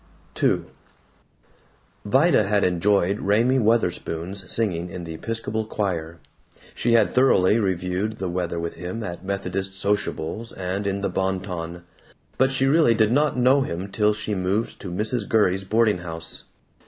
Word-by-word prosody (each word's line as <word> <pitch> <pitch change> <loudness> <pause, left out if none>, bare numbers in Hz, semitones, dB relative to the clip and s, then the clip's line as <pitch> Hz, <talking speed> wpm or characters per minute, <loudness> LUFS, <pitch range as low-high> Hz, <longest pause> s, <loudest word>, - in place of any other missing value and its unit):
II - - +3 1.4
Vida 135 - +4
had 100 0 +2
enjoyed 100 +2 +2
Raymie 115 +7 +2
Wutherspoon's 95 -4 -1
singing 90 -6 0
in 90 0 -7
the 80 -1 -6
Episcopal 110 +4 -3
choir; 85 -7 -3 0.6
she 120 - 0
had 115 -3 +4
thoroughly 115 -5 +4
reviewed 95 +2 -1
the 95 - -3
weather 85 -1 -2
with 85 0 -4
him 90 +7 -6
at 90 -3 -6
Methodist 95 0 -3
sociables 100 +1 -2
and 95 +2 -3
in 100 0 -1
the 100 - 0
Bon 95 +1 -1
Ton. 85 -2 -6 0.6
But 130 0 +4
she 135 0 +2
did 120 -7 +4
not 145 +2 +3
really 125 - -1
know 135 +3 +5
him 95 -4 -4
till 105 0 +2
she 105 0 -3
moved 95 +3 -1
to 95 - -7
Mrs. 105 +4 -2
Gurrey's 95 -3 +2
boarding 110 -1 +2
house. 80 -1 -7
100 Hz, 150 wpm, -23 LUFS, 90-110 Hz, 1.4 s, know